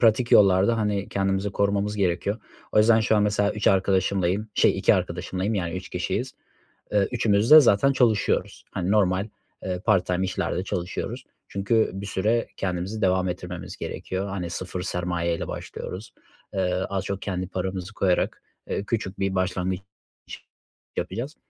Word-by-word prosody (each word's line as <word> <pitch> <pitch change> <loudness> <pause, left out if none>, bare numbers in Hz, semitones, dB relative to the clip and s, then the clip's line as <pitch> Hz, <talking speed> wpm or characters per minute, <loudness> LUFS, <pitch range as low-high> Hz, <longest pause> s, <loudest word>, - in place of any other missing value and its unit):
pratik 115 +1 +3
yollarda, 100 +3 +5
hani, 105 -2 -1
kendimizi 95 +1 0
korumamız 100 +1 0
gerekiyor. 100 +3 0 0.3
O - - +3
yüzden 110 +1 +6
şu 110 0 +2
an 105 - +3
mesela 105 0 +1
3 105 - -4
arkadaşımlayım, 95 +1 +1
şey - - +3
2 - - +4
arkadaşımlayım, 95 +4 -2
yani, 90 -3 -2
3 90 0 -7
kişiyiz. - - -2 0.6
Eee, 100 -2 +3
üçümüz 110 -2 +2
de 155 - +12
zaten 135 +1 +4
çalışıyoruz. 115 -6 +1
Hani, 95 +1 -1
normal, 100 -1 +2 0.4
eee, 90 -1 -2
part-time 95 -3 +2
işlerde 95 -1 -2
çalışıyoruz 90 -2 -4 0.2
çünkü 105 +3 +1
bir 95 +1 -6
süre 110 +4 0
kendimizi 95 +3 -3
devam 95 -1 +2
ettirmemiz 90 0 -6
gerekiyor. 95 +2 -4
Hani, 90 -3 -4
0 90 0 -5
sermaye 85 -1 -1
ile - - -5
başlıyoruz. 95 +5 -7 0.4
Eee, 90 -2 0 0.2
az 100 -1 -2
çok 100 0 -3
kendi 95 -2 -3
paramızı 95 +1 -4
koyarak, 90 -3 0 0.3
eee, - - -1
küçük 105 -3 -3
bir 95 0 0
başlangıç 95 0 -1 1.2
yapacağız 135 +7 -3
95 Hz, 150 wpm, -25 LUFS, 90-105 Hz, 1.2 s, de